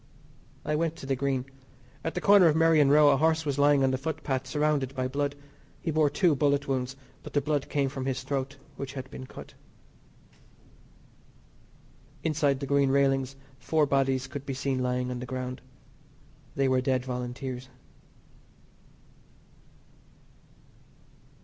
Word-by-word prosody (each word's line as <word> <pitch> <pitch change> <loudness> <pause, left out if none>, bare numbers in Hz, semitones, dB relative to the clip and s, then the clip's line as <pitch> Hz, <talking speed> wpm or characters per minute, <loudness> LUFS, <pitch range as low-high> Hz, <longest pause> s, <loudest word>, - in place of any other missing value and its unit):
I 150 - 0
went 165 +1 0
to 165 - -10
the 135 0 0
Green. 130 -1 -1 0.6
At 165 - -3
the 180 - -2
corner 200 -2 +7
of 155 - +3
Merrion 160 -3 +5
Row 150 0 +7
a - - +3
horse 160 +2 +2
was 145 -1 -1
lying 145 -1 +5
on 130 - +3
the 130 - -1
footpath 135 -3 -3
surrounded 145 -1 0
by 130 0 -1
blood. 140 +2 -2 0.4
He 165 - -2
bore 155 -1 +3
two 155 +3 +3
bullet 140 0 +1
wounds, 130 -1 -2 0.3
but - - -10
the 145 - +3
blood 145 -1 -1
came 140 -2 +1
from 135 0 -4
his 130 0 -2
throat 135 +1 -3 0.2
which 135 -1 -5
had 130 0 -7
been 130 - -8
cut. - - -11 2.7
Inside 150 -3 +1
the - - -2
Green 140 0 +2
railings 135 -1 +2 0.2
four 155 +4 +2
bodies 135 -2 +1
could 135 +1 -7
be 135 -1 -4
seen 135 -1 -1
lying 125 0 -1
on 125 - -4
the 125 - -6
ground. 130 0 -5 0.9
They 135 -1 +2
were 130 -1 +2
dead 130 -1 0
Volunteers. 125 0 -5
135 Hz, 150 wpm, -28 LUFS, 130-145 Hz, 2.7 s, corner